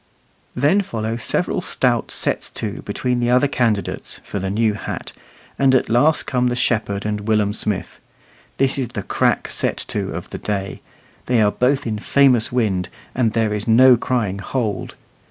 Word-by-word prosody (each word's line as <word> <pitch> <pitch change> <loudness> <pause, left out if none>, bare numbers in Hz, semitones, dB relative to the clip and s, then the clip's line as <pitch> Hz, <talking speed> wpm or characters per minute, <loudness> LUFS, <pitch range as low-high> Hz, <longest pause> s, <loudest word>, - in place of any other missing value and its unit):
Then 150 +11 +3
follow 115 - -3
several 115 - -1
stout - - 0
sets - - -2
to - - -4
between 125 -1 -2
the 120 0 +1
other 125 +3 +4
candidates 115 -7 -1
for 100 - -5
the 95 0 -3
new 110 +2 +1
hat, 105 - -6 0.5
and 135 -1 +4
at 130 - +1
last 145 +7 +3
come 125 -1 +1
the 120 - 0
shepherd 110 -5 0
and 105 0 -3
Willum 105 -2 +2
Smith. 105 -3 -3 0.6
This 135 +1 +1
is 130 - -1
the 110 -4 -6
crack - - +1
set - - 0
to - - -2
of - - -7
the - - -5
day. 100 -2 -3 0.5
They 125 -2 +3
are 105 -1 +4
both 135 +5 +1
in 110 -2 -2
famous 130 -2 +3
wind, 105 -7 0 0.2
and 115 -4 +1
there 110 -2 +1
is 105 +1 -4
no 125 +3 +7
crying 115 -5 -1
"hold." 110 0 -3
115 Hz, 175 wpm, -20 LUFS, 105-125 Hz, 0.6 s, no